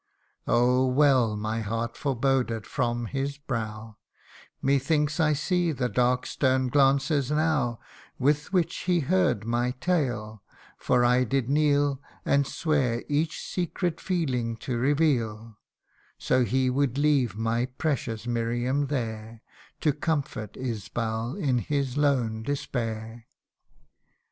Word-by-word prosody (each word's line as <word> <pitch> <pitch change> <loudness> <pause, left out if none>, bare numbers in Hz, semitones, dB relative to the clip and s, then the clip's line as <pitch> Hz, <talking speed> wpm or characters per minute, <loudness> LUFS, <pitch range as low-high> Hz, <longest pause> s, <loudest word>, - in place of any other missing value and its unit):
Oh! 125 +2 +3
well 130 -5 +3
my 110 +2 -2
heart 115 +2 -3
foreboded 130 -4 0
from 120 -3 -1
his 140 +3 -3
brow: 110 -5 -5 0.6
Methinks 145 +3 +1
I 155 -2 +3
see 175 +3 0
the 125 -4 -1
dark 125 +3 +1
stern 130 -2 +1
glances 140 +1 +3
now, 150 -6 +1 0.4
With 145 +6 +1
which 175 -3 +1
he 175 -2 +3
heard 170 - +1
my 120 +2 0
tale, 120 - -1 0.4
for 120 - +2
I 125 +1 +4
did 130 +1 -1
kneel 145 -2 +2 0.2
And 140 -1 +2
swear 135 -7 0
each 155 +2 0
secret 175 -1 -2
feeling 125 -11 -1
to 125 - -1
reveal, 120 -5 0 0.6
So 125 -1 +2
he 130 +1 +1
would 135 0 0
leave 145 -6 +2
my 115 +2 0
precious 125 -5 -3
Miriam 120 +4 0
there, 115 -4 -4 0.4
To 150 - +2
comfort 145 - -3
Isbal 115 0 -3
in 135 -10 +1
his 140 0 -2
lone 130 -7 +1
despair. 115 -3 -4
130 Hz, 120 wpm, -27 LUFS, 115-145 Hz, 0.6 s, I